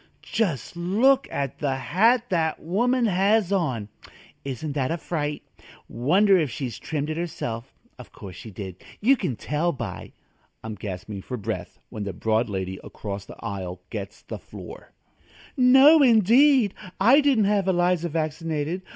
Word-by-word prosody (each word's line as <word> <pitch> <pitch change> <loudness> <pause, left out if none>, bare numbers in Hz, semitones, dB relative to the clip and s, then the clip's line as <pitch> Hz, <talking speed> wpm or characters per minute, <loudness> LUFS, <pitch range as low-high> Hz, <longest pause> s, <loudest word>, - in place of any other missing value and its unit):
just 175 - -2
look 230 +11 +3
at 140 -2 -3
the 140 -3 0
hat 215 - +3
that 165 -4 0
woman 240 +8 +1
has 200 0 +2
on! 130 - 0 0.6
Isn't 140 +2 -4
that 135 -3 -1
a 165 - -1
fright? 150 -3 -3 0.4
Wonder 185 - +3
if 155 -4 0
she 125 0 -4
trimmed 150 +5 -4
it 155 - -4
herself. 130 -8 -5 0.2
Of - - -12
course 95 -3 -10
she 110 - -10
did; 95 -2 -8 0.2
you 260 +6 +5
can 180 - -3
tell 150 +10 -1
by 135 - -7 0.2
" - - -41
I'm 110 - -5
gasping 100 0 -6
for 125 +5 -6
breath 105 - -5
when 105 - -5
the 100 -1 -4
broad 110 +5 0
lady 95 -1 -4
across 100 -1 -7
the - - -11
aisle 95 -4 -5
gets 100 -3 -7
the - - -7
floor: - - -11 0.6
"No, 270 +5 +7
indeed! 240 0 +5 0.3
I 245 +9 +6
didn't 275 -7 +3
have 200 -2 +1
Eliza 175 -2 +1
vaccinated. 160 +1 -2
160 Hz, 155 wpm, -25 LUFS, -, 0.6 s, No